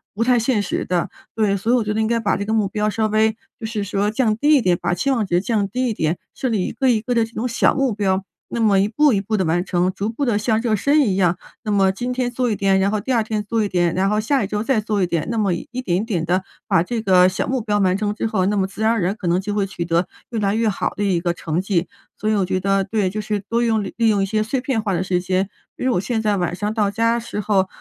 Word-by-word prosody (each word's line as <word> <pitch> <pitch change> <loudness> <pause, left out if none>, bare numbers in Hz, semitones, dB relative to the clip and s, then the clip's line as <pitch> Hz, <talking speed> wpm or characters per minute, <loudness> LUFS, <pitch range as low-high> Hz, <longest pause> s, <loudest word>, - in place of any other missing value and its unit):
不 230 - +1
太 245 0 +3
现 230 -1 +1
实 205 - -2
的。 180 -2 -1 0.3
对， 210 -3 +2
所 210 +5 -1
以 - - +5
我 240 - +2
觉 210 0 -2
得 220 - 0
应 220 - +1
该 230 0 +1
把 205 -3 +1
这 200 - -3
个 220 - -3
目 220 -2 +2
标 210 +2 -1
稍 220 +1 0
微， 220 +1 +3 0.3
就 225 - -4
是 220 -2 -3
说 200 +1 0
降 220 -1 +1
低 295 +6 +4
一 270 - +4
点， 180 -3 +3
把 175 0 0
期 275 +10 0
望 235 -5 +1
值 175 -2 +1
降 205 0 -1
低 255 +5 -1
一 230 - 0
点， 160 -2 -1 0.2
设 260 - -2
立 205 -5 0
一 - - -3
个 265 - 0
一 230 -3 +3
个 245 +3 -2
这 230 -1 +3
种 230 +2 -4
小 235 - +2
目 270 -5 +1
标， 195 -2 0 0.3
那 235 - -3
么 205 -3 +4
一 200 - +3
步 295 +6 +3
一 200 - +2
步 215 +2 -2
地 190 - +1
完 175 +2 +1
成， 180 -1 +1
逐 200 +3 -3
步 260 +6 -3
地 230 -5 +1
像 220 +1 +1
热 230 -3 +1
身 285 +9 +3
一 210 -9 +1
样。 180 -2 +2 0.3
那 215 - -2
么 195 -1 +3
今 245 +6 -3
天 250 -1 -1
做 250 -1 0
一 215 - 0
点， 195 -1 +2
然 195 +1 +2
后 215 - 0
第 260 - -3
2 230 -3 +2
天 215 -1 -2
做 225 +1 0
一 - - 0
点， 175 -2 +1
然 195 +1 +2
后 210 0 +1
下 260 +2 +1
一 - - -2
周 210 0 -2
再 230 0 +1
做 210 -1 -1
一 180 - +1
点。 170 -3 -2
那 230 - -2
么 200 -4 +1
一 170 - -5 0.2
点 175 -7 0
一 - - 0
点 180 -8 -1
地 185 +3 +1 0.2
把 165 - +3
这 230 +4 -3
个 185 -3 +5
小 185 - -2
目 260 0 0
标 210 -1 0
完 185 -1 +2
成 210 0 -1
之 210 - -3
后， 210 -5 0
那 210 - +1
么 190 - +2
自 200 +3 -9
然 220 - +3
而 230 -3 0
然 180 +3 0
可 190 - -5
能 175 +1 +2
就 205 +1 -3
会 205 -1 +1
取 180 -3 -5
得 170 +1 +1 0.2
越 230 - -3
来 200 0 +1
越 225 0 +1
好 195 - -2
的 205 - -2
一 190 -4 +1
个 175 0 -1
成 165 -1 -3
绩。 185 -3 0 0.3
所 215 - -1
以 215 - +2
我 195 -2 +1
觉 185 0 -1
得， 195 +1 +1
对， 200 -1 0
就 215 +3 -4
是 210 0 -2
多 235 +1 +1
用 220 -3 +1
利 225 +3 0
用 200 -2 +2
一 - - +1
些 215 +2 0
碎 250 +4 -1
片 255 -4 -1
化 200 -3 -1
的 175 - 0
时 180 -1 0
间， 185 +2 0 0.3
比 - - -7
如 255 - +2
我 - - +2
现 220 +2 -1
在 210 -2 +1
晚 175 -1 -1
上 210 +3 -2
到 210 -3 +1
家 230 +3 +1
时 230 -2 -5
候， 195 -2 +2
210 Hz, 335 characters per minute, -21 LUFS, 190-225 Hz, 0.3 s, 以